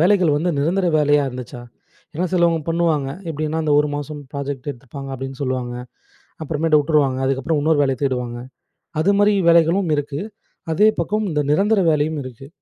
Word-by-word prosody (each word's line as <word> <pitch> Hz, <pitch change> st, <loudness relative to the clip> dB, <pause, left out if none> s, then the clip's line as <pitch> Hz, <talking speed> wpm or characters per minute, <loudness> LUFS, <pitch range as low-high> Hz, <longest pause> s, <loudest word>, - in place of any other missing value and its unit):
வேலைகள் 180 Hz, -3 st, +4 dB
வந்து, 175 Hz, +4 st, 0 dB
நிரந்தர 175 Hz, +5 st, +1 dB
வேலையா 145 Hz, -1 st, +3 dB
இருந்துச்சா? 125 Hz, -1 st, -8 dB, 0.5 s
ஏன்னா, 180 Hz, +4 st, -1 dB
சிலபேர் 170 Hz, -2 st, +3 dB
பண்ணுவாங்க, 165 Hz, -5 st, +1 dB, 0.2 s
எப்டின்னா, 155 Hz, +1 st, -2 dB
அந்த 150 Hz, -1 st, +2 dB
ஒரு 150 Hz, 0 st, -1 dB
மாசம் 145 Hz, +1 st, -6 dB
ப்ராஜெக்ட் 140 Hz, 0 st, -4 dB
எடுத்துப்பாங்க, 135 Hz, +2 st, -9 dB
அப்டின்னு 135 Hz, +1 st, -7 dB
சொல்லுவாங்க. 130 Hz, -2 st, -2 dB, 0.7 s
அப்புறமேட்டு 155 Hz, 0 st, +2 dB
விட்டுருவாங்க. 140 Hz, -3 st, +1 dB
அதுக்கப்புறம், 135 Hz, +3 st, 0 dB
இன்னொரு 155 Hz, -1 st, +2 dB
வேலைய 135 Hz, -2 st, 0 dB
தேடுவாங்க. 125 Hz, -2 st, -2 dB, 0.6 s
அது 200 Hz, +4 st, +3 dB
மாரி, 205 Hz, 0 st, +4 dB
வேலைகளும் 170 Hz, +2 st, +3 dB
இருக்கு. 145 Hz, 0 st, -3 dB, 0.5 s
அதே 210 Hz, +6 st, +5 dB
பக்கம், 210 Hz, +5 st, -1 dB
இந்த 150 Hz, -1 st, 0 dB
நிரந்தர 200 Hz, +5 st, +3 dB
வேலையும் 155 Hz, 0 st, 0 dB
இருக்கு. 130 Hz, +1 st, -10 dB
150 Hz, 150 wpm, -20 LUFS, 135-165 Hz, 0.7 s, அதே